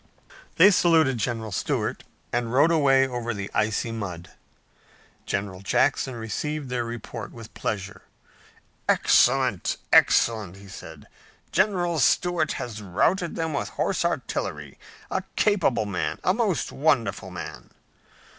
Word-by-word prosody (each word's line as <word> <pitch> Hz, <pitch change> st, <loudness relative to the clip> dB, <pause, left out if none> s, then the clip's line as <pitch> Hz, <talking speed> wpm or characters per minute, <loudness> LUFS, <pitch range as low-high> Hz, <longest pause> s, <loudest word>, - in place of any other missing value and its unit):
They 190 Hz, +5 st, +7 dB
saluted 160 Hz, -, +3 dB
General 110 Hz, -1 st, -2 dB
Stuart, -, -, -2 dB, 0.3 s
and 120 Hz, -1 st, -1 dB
rode 145 Hz, +6 st, +4 dB
away 135 Hz, -4 st, +4 dB
over 120 Hz, -2 st, -3 dB
the 100 Hz, 0 st, -5 dB
icy 110 Hz, +2 st, 0 dB
mud. 90 Hz, -6 st, -6 dB, 1.0 s
General 100 Hz, -2 st, -3 dB
Jackson 130 Hz, +5 st, +1 dB
received 135 Hz, +6 st, -4 dB
their 125 Hz, -1 st, 0 dB
report 115 Hz, -1 st, -7 dB
with 115 Hz, -2 st, -12 dB
pleasure. 100 Hz, -2 st, -4 dB, 0.9 s
"Excellent! -, -, +3 dB, 0.2 s
Excellent!" 105 Hz, -6 st, +4 dB
he 100 Hz, 0 st, -14 dB
said. 80 Hz, -6 st, -11 dB, 0.5 s
"General 175 Hz, -3 st, +1 dB
Stuart 165 Hz, +3 st, +2 dB
has 110 Hz, -3 st, -6 dB
routed 165 Hz, -, 0 dB
them 160 Hz, -1 st, -2 dB
with 140 Hz, -, -2 dB
horse -, -, -1 dB
artillery! -, -, -3 dB, 0.3 s
A -, -, 0 dB
capable 165 Hz, -, +2 dB
man! 100 Hz, -3 st, -2 dB
A 185 Hz, -, +3 dB
most 210 Hz, -6 st, 0 dB
wonderful 140 Hz, -5 st, 0 dB
man!" -, -, -8 dB
120 Hz, 120 wpm, -25 LUFS, 105-160 Hz, 1.0 s, They